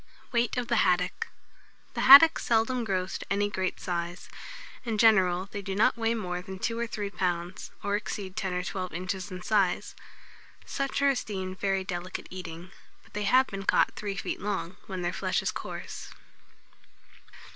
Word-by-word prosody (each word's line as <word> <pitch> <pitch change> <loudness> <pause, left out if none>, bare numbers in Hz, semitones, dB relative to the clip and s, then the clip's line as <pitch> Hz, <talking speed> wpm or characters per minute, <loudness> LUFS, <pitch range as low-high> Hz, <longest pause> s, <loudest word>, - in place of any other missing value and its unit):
WEIGHT 235 0 +1
OF 245 -1 -1
THE 235 - +2
HADDOCK. 180 -2 +1 0.7
The - - -2
haddock 285 +5 +10
seldom 235 +2 +1
grows 185 -3 -2
to - - -8
any 205 +1 +1
great 190 -2 -2
size. 175 0 -4 0.5
In 230 -3 -2
general, 190 -5 +4
they 205 - -4
do 195 0 -4
not 210 - +4
weigh 230 0 0
more 180 -5 -3
than 190 0 -8
two 230 +4 -2
or 235 - -1
three 205 -3 -4
pounds, 175 -1 -2
or 205 0 0
exceed 200 -2 -4
ten 190 - -2
or 180 0 -1
twelve 185 -2 -4
inches 185 +2 -3
in 185 -1 -7
size. 195 -5 +1 0.7
Such 275 0 -2
are 280 - +6
esteemed 190 -7 -4
very 195 -1 0
delicate 185 -1 -5
eating; 180 -1 -8 0.3
but - - -23
they 210 0 -2
have 255 +6 +5
been 195 -4 -6
caught 195 - +3
three 200 -2 -4
feet 200 - -4
long, 195 -3 -3
when 185 -2 -4
their 175 +1 -1
flesh - - -1
is - - 0
coarse. - - -7
195 Hz, 175 wpm, -28 LUFS, 185-220 Hz, 0.7 s, haddock